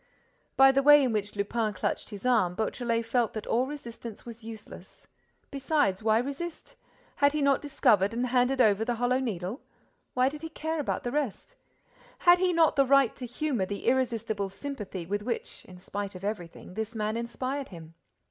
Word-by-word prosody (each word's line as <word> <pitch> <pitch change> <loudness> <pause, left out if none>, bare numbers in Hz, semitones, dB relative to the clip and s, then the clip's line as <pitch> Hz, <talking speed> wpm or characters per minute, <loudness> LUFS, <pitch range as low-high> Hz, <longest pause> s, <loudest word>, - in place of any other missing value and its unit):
By 270 0 +8
the 270 0 +2
way 295 0 +8
in 250 -3 +1
which 205 -1 -2
Lupin 210 +2 -1
clutched - - -2
his 205 +2 -9
arm, 220 -8 +3
Beautrelet 230 +2 -1
felt 235 0 +1
that 215 - -5
all 250 +3 +1
resistance 235 -6 -8
was 235 -1 -10
useless. 225 -1 -11 0.5
Besides, 275 -8 +1
why 220 0 +3
resist? 280 +7 -4 0.4
Had 285 0 +4
he 305 - 0
not 280 -1 +3
discovered 210 -9 +3
and 240 +2 -1
handed 250 +1 +2
over 215 -2 +4
the 240 +1 -1
Hollow 245 +2 +1
Needle? 210 - -3 0.5
What 255 +2 +3
did 300 0 -9
he 325 - -6
care 320 0 -3
about 290 - -2
the 245 - -2
rest? 290 - -3 0.6
Had 350 0 +6
he 370 0 +2
not 330 -2 +4
the 275 - +4
right 275 -3 +4
to 250 - -6
humor 245 -5 -1
the 200 0 -5
irresistible 230 -6 0
sympathy 200 -6 -6
with 205 +4 -2
which, 235 +1 -4
in 180 - -13
spite 200 +2 -5
of 185 - -9
everything, 190 -4 -5
this 220 +3 -4
man 215 0 -1
inspired 255 +4 -3
him? 165 -3 -11
235 Hz, 185 wpm, -28 LUFS, 210-275 Hz, 0.6 s, By